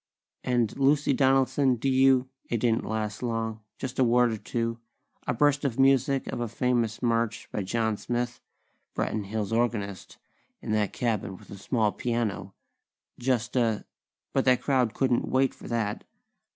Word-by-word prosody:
"And 120 -4 +1
Lucy 140 +1 +3
Donaldson, 135 0 +3
do 120 +3 -3
you...?" 130 -1 +4 0.2
It 120 - +1
didn't 115 0 +1
last 110 -1 -3
long. 115 -2 -2 0.2
Just 130 -1 -5
a - - +6
word 120 0 +4
or 110 - -3
two; 115 +1 -2 0.5
a - - +1
burst 145 +3 +3
of 130 -4 -1
music 135 0 +3
of - - -4
a 120 - -1
famous 120 0 0
march 115 -2 0
by - - -2
John 110 +2 0
Smith, 120 +2 -3 0.5
Branton 105 -2 -1
Hills' 105 +1 -3
organist, 110 -5 -2 0.4
in - - -5
that 105 -2 +1
cabin 105 -5 -2
with - - -16
a 100 - -8
small 110 0 +1
piano; 110 -6 -2 0.6
just 120 -2 0
a 115 -4 +1 0.5
But 135 - +2
that 125 -1 +3
crowd 130 -5 +1
couldn't 130 -3 +1
wait 130 0 +2
for - - -12
that! 110 -3 -2
120 Hz, 160 wpm, -27 LUFS, 110-130 Hz, 0.6 s, a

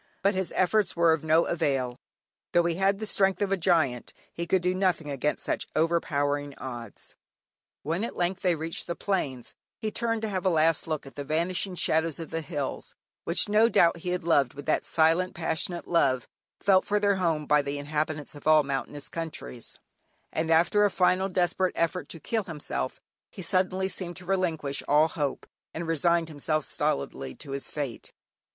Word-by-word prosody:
But 200 +1 +4
his 190 -1 -2
efforts 190 +1 +2
were 170 -1 +5
of 160 -1 -2
no 160 +1 +4
avail; 135 -7 -1 0.5
though 175 - +5
he 170 0 +1
had 195 +3 +2
the 215 - -4
strength 195 -2 +2
of 200 -1 0
a - - +4
giant 160 -9 +1 0.2
he 170 0 -4
could 185 0 +2
do 180 0 +2
nothing 180 -5 0
against 140 +2 -1
such - - -1
overpowering 145 -3 0
odds. 120 -4 -8 0.7
When 165 +7 -1
at 235 - -4
length 180 +2 -1
they 180 -2 +2
reached 160 +1 -3
the 170 - -2
plains, 140 - -2 0.2
he 215 - -3
turned 230 -1 -1
to - - 0
have 190 -3 -2
a 190 - +3
last 160 -2 +2
look 155 -3 -2
at 135 - -11
the 145 - -5
vanishing 175 +5 -1
shadows 160 -1 +1
of 165 - -7
the 165 - -2
hills, 145 -4 -5 0.3
which - - +4
no 215 +2 +4
doubt 170 -6 +4
he 175 +2 -5
had 180 0 -1
loved 145 -7 +2
with 145 - -8
that - - +1
silent, 165 +4 +2
passionate 170 +1 -2
love 130 -8 +2 0.3
felt 190 -2 +4
for 210 0 +1
their 205 -1 +2
home 165 -5 0
by 150 0 +4
the 140 0 -4
inhabitants 150 +1 -3
of 145 0 -9
all 155 -1 +6
mountainous 140 +1 -4
countries, 160 - -6 0.6
and 160 +1 -1
after 170 +6 +4
a 205 - +5
final 185 +1 +2
desperate 180 0 +1
effort 170 +2 -1
to 165 - -7
kill 220 +4 -2
himself, 145 - -4 0.3
he 190 - -8
suddenly 185 0 +1
seemed 180 -2 -5
to 180 - -11
relinquish 165 -7 -1
all 150 +2 +4
hope, 145 -3 -3 0.3
and 170 +1 -3
resigned 165 +1 +2
himself 155 0 -1
stolidly 70 -1 -2
to 140 - -8
his 140 0 -4
fate. 140 -6 -5
165 Hz, 185 wpm, -27 LUFS, 150-185 Hz, 0.7 s, all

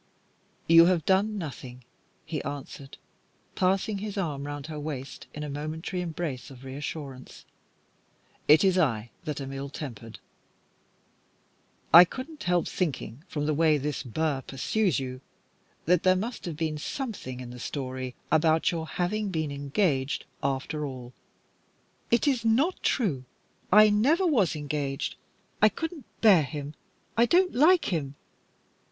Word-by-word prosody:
"You 165 0 +8
have 175 -3 +2
done 205 +3 +2
nothing," 130 -7 -7 0.4
he 155 -3 -3
answered, 140 -1 -7 0.6
passing 195 +2 +1
his 210 0 -5
arm 145 -7 -2
round 145 -1 -5
her 155 -1 -6
waist 140 -3 -6
in 150 - -6
a - - -4
momentary 155 +5 -4
embrace 155 -6 -4
of 135 -1 -13
reassurance. 135 -1 -7 1.0
"It 150 +4 +7
is 190 -1 +4
I 120 -8 0
that 150 -3 -3
am 135 0 -6
ill 135 +1 -5
tempered. 120 -6 -8 1.8
I 170 +2 +12
couldn't 265 - -7
help 175 -1 +2
thinking 145 - -3
from 150 -3 -3
the 155 - +1
way 155 0 +4
this 145 +1 -3
Burr 140 +2 -1
pursues 165 - 0
you 130 -1 -6 0.6
that 175 +1 +4
there 185 0 +4
must 225 +5 -4
have 165 -4 -5
been 155 -2 -2
something 195 - -5
in 125 -1 -7
the 125 - -9
story 130 -1 -4 0.2
about 160 +1 +3
your 165 -2 -3
having 200 +5 -1
been 155 -5 -2
engaged, 140 0 0 0.2
after 140 +3 -2
all." 130 -3 -7 1.0
"It 235 +5 +3
is 255 -5 +2
not 260 +11 +2
true. 155 - 0 0.5
I 210 +2 +8
never 285 - +3
was 225 - +2
engaged. 145 -2 -3 0.5
I 215 - +7
couldn't 320 - -6 0.2
bear 200 -7 +7
him. 145 0 -5 0.4
I 235 +1 +4
don't 360 +4 +3
like 310 - +4
him. 140 -4 -2
155 Hz, 140 wpm, -27 LUFS, 140-195 Hz, 1.8 s, I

